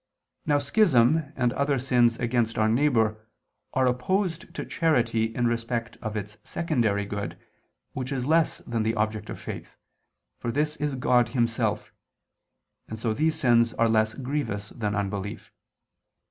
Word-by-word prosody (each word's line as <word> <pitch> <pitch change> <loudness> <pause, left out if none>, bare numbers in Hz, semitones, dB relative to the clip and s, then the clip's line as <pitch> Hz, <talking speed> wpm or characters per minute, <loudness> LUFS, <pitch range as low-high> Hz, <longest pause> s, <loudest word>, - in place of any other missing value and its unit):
Now 145 -1 +4
schism 145 - +3
and 125 -2 +1
other 140 +1 +1
sins 120 -2 +3
against 120 -1 0
our 110 -1 +3
neighbor, 110 -3 +2 0.5
are 130 0 +3
opposed 165 +8 0
to - - -4
charity 120 -9 +1
in 115 +2 -1
respect 115 0 -2
of 110 -2 -3
its 105 +1 -6
secondary 115 -12 0
good, 100 0 -5 0.6
which 130 0 -4
is 130 -2 -2
less 160 +2 +3
than 115 -1 -1
the 110 +1 0
object 110 0 -2
of - - -6
faith, - - -8 0.6
for 120 - -2
this 150 +3 0
is 145 -2 -1
God 125 -2 +3
Himself; 115 -1 -1 0.9
and 110 - -6
so 110 0 -1
these 155 +6 +1
sins 120 -6 +3
are 115 - +3
less 110 -1 +2
grievous 125 -7 -3
than 105 -3 -3
unbelief. 100 0 -4
120 Hz, 145 wpm, -26 LUFS, 110-140 Hz, 0.9 s, Now